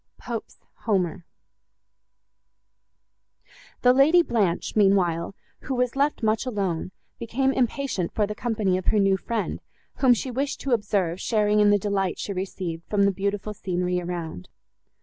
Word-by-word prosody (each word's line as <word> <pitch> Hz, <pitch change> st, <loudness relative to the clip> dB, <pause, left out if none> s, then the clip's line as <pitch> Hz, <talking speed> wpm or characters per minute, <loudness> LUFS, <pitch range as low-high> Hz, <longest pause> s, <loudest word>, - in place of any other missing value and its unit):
POPE'S 235 Hz, -2 st, -6 dB, 0.3 s
HOMER 180 Hz, -5 st, 0 dB, 2.6 s
The 250 Hz, 0 st, +6 dB
Lady 310 Hz, +7 st, +5 dB
Blanche, 200 Hz, -, 0 dB
meanwhile, 195 Hz, -4 st, +2 dB, 0.2 s
who 265 Hz, -, -4 dB
was 250 Hz, 0 st, 0 dB
left 280 Hz, -2 st, 0 dB
much 220 Hz, +3 st, +1 dB
alone, 190 Hz, -7 st, -2 dB, 0.3 s
became 265 Hz, +4 st, 0 dB
impatient 250 Hz, -8 st, -1 dB
for 210 Hz, -, +1 dB
the 210 Hz, -, -4 dB
company 210 Hz, -5 st, 0 dB
of 185 Hz, -, -10 dB
her -, -, +3 dB
new 195 Hz, -1 st, +4 dB
friend, 215 Hz, +2 st, -3 dB, 0.4 s
whom 255 Hz, -3 st, +5 dB
she 255 Hz, +3 st, -4 dB
wished 275 Hz, +3 st, -2 dB
to 275 Hz, -, -3 dB
observe 195 Hz, -6 st, 0 dB
sharing 210 Hz, -2 st, +2 dB
in 210 Hz, 0 st, +5 dB
the 205 Hz, -, +5 dB
delight 195 Hz, -2 st, -1 dB
she 200 Hz, -, -4 dB
received 185 Hz, -3 st, -4 dB
from 205 Hz, -1 st, +2 dB
the 200 Hz, -, +4 dB
beautiful 200 Hz, +2 st, -3 dB
scenery 180 Hz, -2 st, -2 dB
around. 170 Hz, -, -6 dB
205 Hz, 145 wpm, -25 LUFS, 185-235 Hz, 2.6 s, The